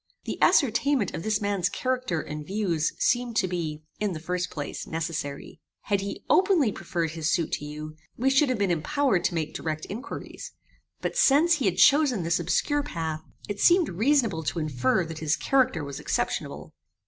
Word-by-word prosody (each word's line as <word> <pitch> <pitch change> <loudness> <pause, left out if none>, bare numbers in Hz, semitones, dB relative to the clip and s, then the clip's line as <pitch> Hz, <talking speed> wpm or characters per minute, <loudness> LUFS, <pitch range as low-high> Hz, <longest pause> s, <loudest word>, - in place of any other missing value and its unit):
The - - -5
ascertainment 265 - +3
of - - -4
this 215 +3 0
man's 200 -3 0
character 255 -9 -1
and 150 0 -6
views 175 -3 -1
seemed 245 -1 +1
to 215 -5 +2
be, 160 -4 -4 0.2
in 205 -2 -1
the 160 - -5
first 180 +2 -2
place, 145 -2 -6
necessary. 160 -3 -5 0.2
Had 200 -1 0
he 200 0 -6
openly 365 - +4
preferred 170 -3 -3
his 160 -1 -2
suit 170 -3 0
to 150 - -2
you, 150 +1 -7 0.2
we 265 +3 +2
should 275 +1 +4
have 255 - 0
been 200 -3 +1
impowered 195 - +1
to 175 - 0
make 155 -2 -2
direct 155 -1 -4
inquiries; 245 +8 -7 0.5
but - - -3
since 335 - +5
he 270 - -2
had 180 -2 +1
chosen 280 - +5
this 165 +1 +1
obscure 290 - +1
path, 160 - -4 0.3
it 205 -1 -4
seemed 350 - +5
reasonable 220 - +2
to 160 - -3
infer 150 +2 +1
that 160 -1 -7
his 155 -1 +1
character 260 - +2
was 140 -1 -6
exceptionable. - - -3
185 Hz, 180 wpm, -26 LUFS, 160-255 Hz, 0.5 s, since